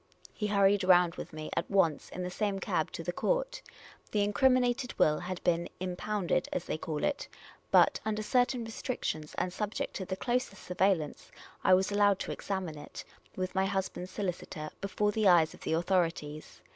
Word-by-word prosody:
He 210 - -2
hurried 200 -1 +4
round 180 -2 +5
with - - -7
me 155 -1 -7
at 170 - -1
once 170 -7 +2
in 180 - -5
the 180 - -4
same 205 +1 -1
cab - - -1
to - - -5
the - - -3
court. - - -1 0.5
The 210 -1 +1
incriminated 250 +3 +2
will 150 0 +4
had 180 0 -5
been 170 -1 +1
" - - -36
impounded," 185 0 -1
as 180 - -2
they 155 - -3
call 155 -2 -3
it; 290 -1 -1 0.4
but, - - +5
under 215 0 -1
certain 245 +1 +1
restrictions, 220 - -4
and 180 - -1
subject 210 +2 -3
to 190 - -4
the 190 - -3
closest 240 -3 -2
surveillance, 180 -4 0 0.3
I 185 - +7
was 190 +2 +1
allowed 205 -1 +4
to - - -3
examine 185 -6 -4
it - - -9 0.3
with 185 0 -3
my 190 0 +2
husband's 190 -2 -3
solicitor, 175 -6 -4
before 205 +1 0
the 215 -1 +2
eyes 170 -4 +5
of - - -14
the - - -1
authorities. 165 -3 -1
190 Hz, 185 wpm, -31 LUFS, 175-210 Hz, 0.5 s, I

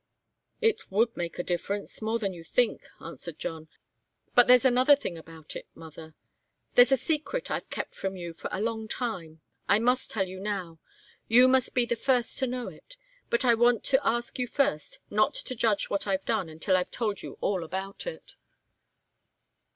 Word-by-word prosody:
"It 450 -2 +1
would 225 +4 +2
make 170 -1 -4
a 175 - -2
difference 195 +5 -3
more 220 +1 0
than 200 -4 -2
you 170 -2 -10
think," 240 +7 0
answered 165 -1 -8
John. 160 -1 -5 0.7
"But 245 - +6
there's 250 +1 +7
another 255 +3 +6
thing 190 -10 -5
about 160 -1 -10
it, - - -7
mother 160 -1 -11 0.6
there's 245 +2 +7
a 270 - +5
secret 320 - -2
I've - - -3
kept - - -4
from 195 0 -4
you 175 -2 -6
for - - -6
a 195 - -2
long 220 -1 -2
time. 175 -10 -4 0.3
I - - +6
must 250 +3 +2
tell 195 -3 -1
you 185 +1 -8
now. 190 -5 -4 0.5
You 245 +3 +7
must 260 -1 +2
be 245 -1 +4
the 235 - 0
first 245 0 +1
to 265 - +1
know 250 0 -3
it. - - -12 0.3
But 235 +2 +1
I 240 - +6
want 240 -1 +3
to 265 0 +2
ask 240 +2 -1
you 250 - 0
first 285 - 0
not - - +2
to - - -5
judge 220 -4 +1
what 200 0 -1
I've 190 -1 0
done 165 - 0
until 160 +4 0
I've 180 -1 +1
told 215 -4 -2
you - - -9
all 190 -4 0
about 190 - -5
it." - - -8
220 Hz, 190 wpm, -28 LUFS, 180-250 Hz, 0.7 s, there's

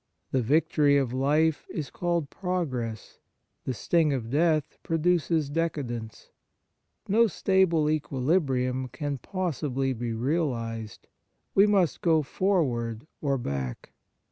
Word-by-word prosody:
The 130 - +2
victory 145 +2 +3
of 130 -3 0
life 150 +4 +1
is 150 -4 -5
called 170 -5 -1
progress, 130 - -3 0.5
the 130 - -1
sting 160 +3 +2
of 120 -3 -3
death 155 0 +1
produces 165 -2 +1
decadence. 140 -8 -3 0.8
No 230 +4 +4
stable 185 -5 +2
equilibrium 130 -3 0
can 145 +1 -4
possibly 145 - -2
be 120 -1 -3
realized; 115 -5 -2 0.5
we 200 +2 +6
must 190 -8 +2
go 160 -3 +3
forward 130 - 0 0.2
or 140 -2 +1
back. 70 - -4
145 Hz, 110 wpm, -27 LUFS, 125-165 Hz, 0.8 s, we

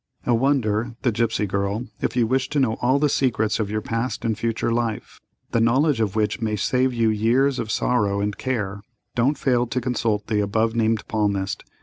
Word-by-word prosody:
"A 120 - +2
Wonder—The 120 -2 +1
Gipsy 110 -1 0
Girl.—If 100 +7 -3
you 120 -2 +3
wish 130 +3 0
to 150 - 0
know 125 -5 +2
all 130 +3 +3
the 150 +1 +3
secrets 115 -6 +1
of 105 -2 -1
your 110 +1 -2
past 115 +1 -3
and 110 -1 +1
future 115 +2 -1
life, 115 -2 -3 0.3
the 115 - +2
knowledge 130 +3 +3
of 105 -2 -1
which 110 +2 0
may 110 -1 0
save 130 +5 +1
you 115 -2 +1
years 125 +5 +2
of 115 -2 -3
sorrow 105 -4 +1
and 100 0 -1
care, 105 -6 -3 0.3
don't 130 +5 +1
fail 125 -3 +1
to 125 +2 -1
consult 115 -4 -1
the 110 -1 0
above 110 +2 +1
named 110 -1 +1
palmist. 100 -3 -1
115 Hz, 190 wpm, -23 LUFS, 105-125 Hz, 0.3 s, you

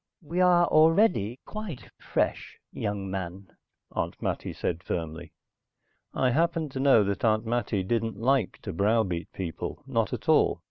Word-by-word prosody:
"We 170 +4 -1
are 175 -1 +5
already 155 - +3
quite 195 - -7
fresh, - - -2 0.2
young 100 -2 -3
man," 95 0 -6 0.4
Aunt - - -3
Mattie - - -3
said 85 -1 -3
firmly. 80 0 -4 0.8
I 130 -1 +1
happened 165 +1 +1
to 130 - -5
know 135 -5 +5
that 100 0 -2
Aunt 110 0 +2
Mattie 115 -4 -1
didn't 115 +1 -1
like 130 +5 +1
to 100 - -5
browbeat 100 -2 +1
people, 90 -4 -5
not - - 0
at - - -5
all. - - +4
115 Hz, 145 wpm, -27 LUFS, 95-150 Hz, 0.8 s, are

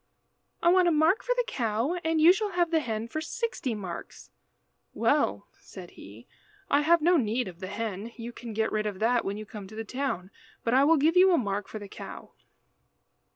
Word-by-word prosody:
"I 340 - +5
want 365 0 +5
a - - +4
mark 320 +6 +3
for - - -1
the - - +1
cow, 235 - -1
and 320 0 +1
you 330 +3 +8
shall 410 -1 -3
have 350 -1 +1
the 325 - +3
hen 225 -5 -3
for 310 +6 -4
sixty 335 - -3
marks." 185 -5 -8 0.6
"Well," 100 +1 +1
said 180 -3 -11
he, 105 +4 -13 0.5
"I 285 - +4
have 330 +1 +3
no 350 +2 +5
need 235 -2 0
of 175 -2 -10
the 185 - -6
hen. 210 +1 -4
You 235 0 -7
can 235 -1 -8
get 220 +1 0
rid 215 0 -1
of 205 -2 -4
that 235 +3 +2
when 200 +1 -3
you 215 - -7
come 205 -2 -9
to 215 - -12
the 225 - -4
town, 235 -7 -3 0.3
but 230 - 0
I 265 +2 +5
will 325 +2 +5
give 315 +4 +2
you 370 +1 +6
a - - +4
mark 205 -5 -2
for - - -7
the 205 -1 -8
cow." - - -10
235 Hz, 215 wpm, -28 LUFS, 210-325 Hz, 0.6 s, you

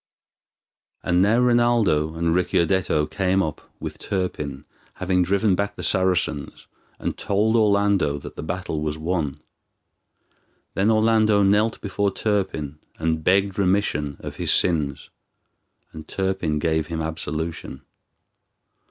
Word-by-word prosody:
And 90 0 +2
now 105 +4 +4
Rinaldo 120 -11 +2
and 85 0 0
Ricciardetto 85 -2 +1
came 95 +2 0
up, 75 -3 -4 0.2
with - - -6
Turpin, 75 -7 -3 0.3
having 90 0 +1
driven 100 +3 +2
back 100 +2 -1
the - - -7
Saracens, 90 -6 0 0.3
and - - -4
told 105 +3 +1
Orlando 100 -8 +2
that 70 - -9
the - - -6
battle 80 0 -4
was 75 0 -2
won. 80 -3 -2 1.3
Then 100 +3 +1
Orlando 110 -2 +3
knelt 105 +3 +2
before 100 0 -1
Turpin 95 -9 -2 0.2
and 80 0 -1
begged 100 +3 +2
remission 90 -7 0
of - - -7
his - - +1
sins, 75 -6 +1 0.8
and 80 -1 -10
Turpin 95 -5 -1
gave 80 -1 0
him 80 0 -4
absolution. 80 -2 -4
90 Hz, 120 wpm, -23 LUFS, 80-100 Hz, 1.3 s, now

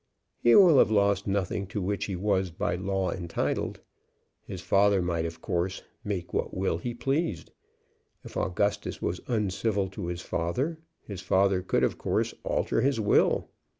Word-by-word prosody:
"He 120 - +5
will 175 -8 +8
have - - +5
lost 100 -2 +2
nothing 100 0 -1
to 95 - -4
which 100 +2 -1
he 100 - -4
was 95 0 0
by 85 - -2
law 95 0 -1
entitled. 85 -3 -2 0.7
His - - -6
father 100 0 +3
might 85 -2 -1
of 80 0 -6
course 90 +2 -2 0.2
make 95 -5 -4
what - - -2
will 95 -3 0
he 120 +6 -4
pleased. 135 - -2 0.7
If - - -11
Augustus 100 +3 -1
was 90 - -3
uncivil 100 -3 0
to 95 -2 -6
his 85 0 -4
father, 125 - -2 0.2
his 100 -3 -7
father 95 0 +2
could 90 - 0
of - - 0
course - - 0
alter - - 0
his 135 -2 +1
will. 105 -1 +2
95 Hz, 160 wpm, -28 LUFS, 90-105 Hz, 0.7 s, will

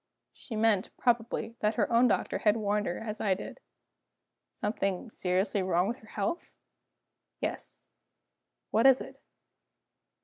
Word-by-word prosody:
"She 230 - -9
meant, 215 -3 +2
probably, 230 -1 0
that 210 +1 +1
her 235 - +1
own 240 +2 +6
doctor - - 0
had 210 +1 +3
warned 210 -1 0
her 175 - -2
as 220 -1 -5
I 195 -3 +2
did." - - -8 1.0
"Something 210 0 -2
seriously 190 +2 0
wrong 185 0 +2
with 235 +3 -2
her 220 - -18
health?" 210 - -3 0.8
"Yes." - - -5 0.9
"What 225 +4 +5
is 265 -1 +7
it?" - - -9
215 Hz, 135 wpm, -30 LUFS, 195-230 Hz, 1.0 s, is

